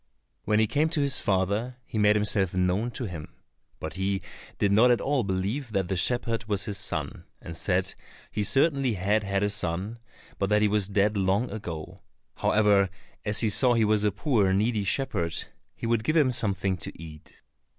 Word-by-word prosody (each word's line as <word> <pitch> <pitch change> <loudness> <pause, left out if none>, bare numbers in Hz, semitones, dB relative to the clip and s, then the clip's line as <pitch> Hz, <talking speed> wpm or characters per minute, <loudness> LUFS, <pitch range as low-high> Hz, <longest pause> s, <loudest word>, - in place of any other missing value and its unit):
When 105 - +2
he 110 - +4
came 150 +8 +1
to 160 -2 -2
his 140 -1 +2
father, 100 +6 0
he 110 - -4
made 105 0 +4
himself 105 -3 +1
known 90 +5 +1
to 125 - -6
him, 85 -6 -7 0.5
but 80 - -5
he 95 +1 -1 0.3
did 100 - +1
not 115 +5 +6
at 120 - +4
all 140 -3 0
believe 105 +6 -2
that 95 -3 0
the 95 - 0
shepherd 115 +3 0
was 100 -4 -1
his 100 -2 -4
son, 80 -7 -4
and 85 - -9
said - - 0 0.4
he 105 - -1
certainly 135 - +2
had 100 +3 +1
had 100 0 -1
a 105 - +2
son, 100 +3 -2 0.4
but 100 - 0
that 105 0 +3
he - - +5
was 105 -2 +1
dead 100 +1 +2
long 100 +4 +1
ago; 85 -8 -7 0.4
however, 105 -2 +3 0.4
as 105 -1 0
he 110 - +2
saw 120 +4 +3
he 115 -1 +3
was 105 0 +2
a 105 - +2
poor, 105 - +1
needy 105 +2 +1
shepherd, 85 - -1 0.4
he - - -6
would 115 -1 +1
give 155 +7 0
him 140 -5 +4
something 100 -4 0
to - - -8
eat. 80 -2 -12
105 Hz, 190 wpm, -27 LUFS, 95-115 Hz, 0.5 s, not